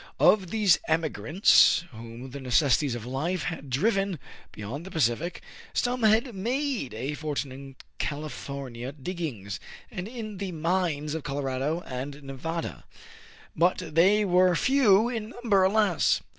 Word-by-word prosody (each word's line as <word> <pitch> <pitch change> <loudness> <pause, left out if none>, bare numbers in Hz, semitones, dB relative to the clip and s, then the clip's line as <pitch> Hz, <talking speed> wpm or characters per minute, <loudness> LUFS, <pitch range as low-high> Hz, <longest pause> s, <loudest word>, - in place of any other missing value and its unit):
Of 190 -4 +4
these 205 -5 +4
emigrants 160 - +4
whom 115 +3 -9
the 140 - -7
necessities 130 0 +2
of 120 -2 -6
life 155 +9 -2
had 165 -5 -5
driven 195 - +1 0.3
beyond 115 +9 -6
the 190 - -8
Pacific, 155 +2 -1 0.3
some 245 0 0
had 225 +3 +3
made 235 - -2
a 130 +6 -3
for 150 0 -4
tune 140 -1 -2
in 135 0 -10 0.2
California 140 -4 -5
diggings, 135 - -5 0.3
and 185 -2 -5
in 215 -4 -7
the 195 -3 -4
mines 165 -3 -1
of 160 - -3
Colorado 140 +3 -2
and 140 +1 -6
Nevada; 160 +5 -5 0.7
but 175 +3 +3 0.2
they 195 +6 +5
were 180 -1 +4
few 230 -3 +4
in 225 -3 -4
num 230 - -5
ber, 195 -1 +6
alas 195 -3 +3
160 Hz, 140 wpm, -27 LUFS, 135-195 Hz, 0.7 s, ber